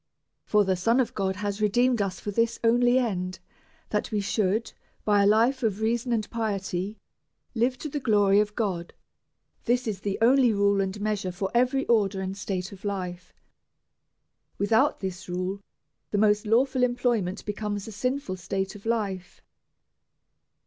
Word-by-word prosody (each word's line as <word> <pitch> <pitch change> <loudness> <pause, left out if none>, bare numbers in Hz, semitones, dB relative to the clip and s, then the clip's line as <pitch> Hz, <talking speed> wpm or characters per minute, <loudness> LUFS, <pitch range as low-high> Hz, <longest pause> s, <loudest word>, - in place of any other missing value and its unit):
For 210 -1 +3
tlie 185 -1 0
Son 230 +7 +3
of 255 - 0
God 190 -1 -1
has 205 +2 -3
redeemed 240 +3 +3
us 190 -3 -2
for 205 - -4
this 230 +2 0
only 245 +2 +4
end, 185 -7 -1 0.5
that 210 - -1
we 210 - 0
should, 200 +2 0 0.3
by 205 -1 +4
a 200 - +4
life 235 +6 +3
of 215 -4 0
reason 235 +3 0
and 220 -3 0
piety, 200 -3 -2 0.6
live 250 +2 +1
to 305 - -5
the 290 0 -3
glory 205 -5 +4
of 210 0 0
God. 185 -7 -2 0.7
This 245 +1 +1
is 210 -4 -3
the 200 -1 -2
only 245 +1 +5
rule 200 -1 +2
and 195 +1 -3
measure 205 -3 -1
for 190 +2 -3
every 255 +3 +2
order 205 -4 +2
and 190 0 -3
state 190 -2 -4
of 195 -1 -12
life. 185 -3 -4 1.3
Without 220 +7 +2
this 185 -1 -5
rule, 185 +2 -3 0.5
the 205 - -1
most 210 0 +3
lawful 255 +4 +2
employment 240 -6 0
becomes 205 -1 -3
a - - -6
sinful 250 -2 -2
state 190 +1 -3
of 210 +1 -10
life. 200 -6 -2
210 Hz, 160 wpm, -26 LUFS, 195-235 Hz, 1.3 s, only